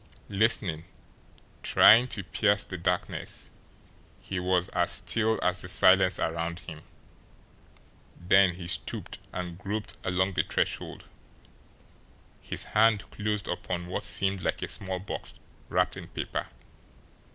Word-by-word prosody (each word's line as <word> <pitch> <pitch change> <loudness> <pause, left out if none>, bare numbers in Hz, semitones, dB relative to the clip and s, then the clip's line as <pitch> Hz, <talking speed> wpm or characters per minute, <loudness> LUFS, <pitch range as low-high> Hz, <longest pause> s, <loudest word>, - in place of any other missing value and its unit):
Listening, 100 -6 +1 0.8
trying 120 +4 +6
to 105 -5 -2
pierce 105 +2 +1
the 95 - -7
darkness, 85 - -3 0.7
he 95 - -4
was 90 0 +1
as 90 -1 +1
still 110 +2 +2
as 90 0 +1
the - - -6
silence 95 0 +5
around 85 +1 -2
him; 80 -2 -10 1.4
then 90 0 +4
he 90 -1 -8
stooped 90 - -2
and 90 -1 -6
groped 105 +1 -4
along 95 +2 0
the - - +2
threshold. - - -2 1.4
His - - -3
hand 110 -1 +2
closed 105 -2 -2
upon 90 -1 -3
what 90 - -2
seemed 95 -1 0
like - - -2
a - - -2
small 95 -1 -3
box 95 +2 -7 0.3
wrapped - - +1
in - - -8
paper. - - -4
95 Hz, 125 wpm, -28 LUFS, 90-100 Hz, 1.4 s, trying